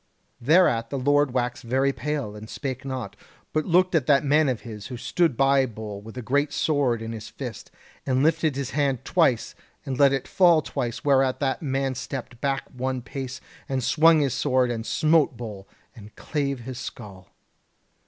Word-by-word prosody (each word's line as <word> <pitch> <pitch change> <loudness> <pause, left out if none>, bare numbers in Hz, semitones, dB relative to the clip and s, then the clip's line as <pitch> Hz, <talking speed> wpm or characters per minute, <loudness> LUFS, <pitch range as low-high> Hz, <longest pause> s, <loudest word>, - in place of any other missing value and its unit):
"Thereat 120 -5 +3
the 140 - -3
Lord 145 +2 +3
waxed 125 -1 -2
very 135 +3 +1
pale, 145 -9 -3
and 105 +1 -10
spake 135 -2 -5
not, 130 -6 -5 0.4
but 155 0 0
looked 185 +1 +3
at 155 -6 +1
that 140 -1 +4
man 150 +1 +3
of 125 -4 -2
his 105 -4 -8
who 125 - -6
stood 125 +3 0
by 135 -1 +4
Bull 105 -3 -7
with 110 +4 -11
a 125 - -5
great 145 +5 +1
sword 135 -9 +1
in 115 - -5
his 110 -2 -7
fist, - - -8 0.3
and 130 0 +1
lifted 160 -1 +2
up - - -8
his 140 -3 -3
hand 135 -2 0
twice, 150 -10 +2 0.3
and 130 -2 -4
let 140 -1 +6
it 135 -2 -2
fall 170 -4 +4
twice, 120 0 -4
whereat 135 -2 +3
that 135 -2 -1
man 135 -2 -1
stepped 125 -2 -7
back 135 -1 0
one 130 0 -3
pace, 130 +2 -6 0.3
and 130 -2 -1
swung 160 +3 +5
his 140 -3 0
sword, 130 -3 +1
and 115 -1 -4
smote 155 -5 +2
Bull, 105 -5 -8 0.3
and 105 -2 -13
clave 140 -4 -2
his 125 +1 -7
skull. 100 -7 -9
130 Hz, 185 wpm, -25 LUFS, 120-145 Hz, 0.4 s, let